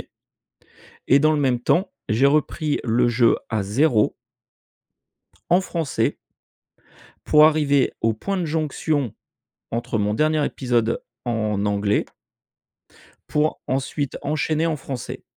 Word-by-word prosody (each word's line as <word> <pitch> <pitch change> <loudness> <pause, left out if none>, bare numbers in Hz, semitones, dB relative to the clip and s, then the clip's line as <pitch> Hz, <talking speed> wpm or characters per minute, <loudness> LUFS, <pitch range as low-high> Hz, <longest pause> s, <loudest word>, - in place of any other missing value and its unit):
temps - - -27 2.0
j'ai 120 +6 +4
repris 150 +1 0
le 120 +1 +2
jeu 120 0 +3
à 110 -3 0
0 110 +2 +2 1.4
en 180 +2 +5
français 165 -6 -2 1.1
pour 150 0 +7
arriver 145 -3 +2
au 115 0 +2
point 195 - -3
de 180 - -1
jonction 150 -4 -1 0.6
entre 115 -1 -2
mon 105 0 0
dernier 155 +4 +1
épisode 120 -3 0 0.2
en 110 -3 -1
anglais 100 0 +1 1.2
pour 150 +1 0
ensuite 135 +1 -2
enchaîner 155 +2 0
en 160 -2 0
français. 130 -3 -7
135 Hz, 100 wpm, -22 LUFS, 115-155 Hz, 2.0 s, pour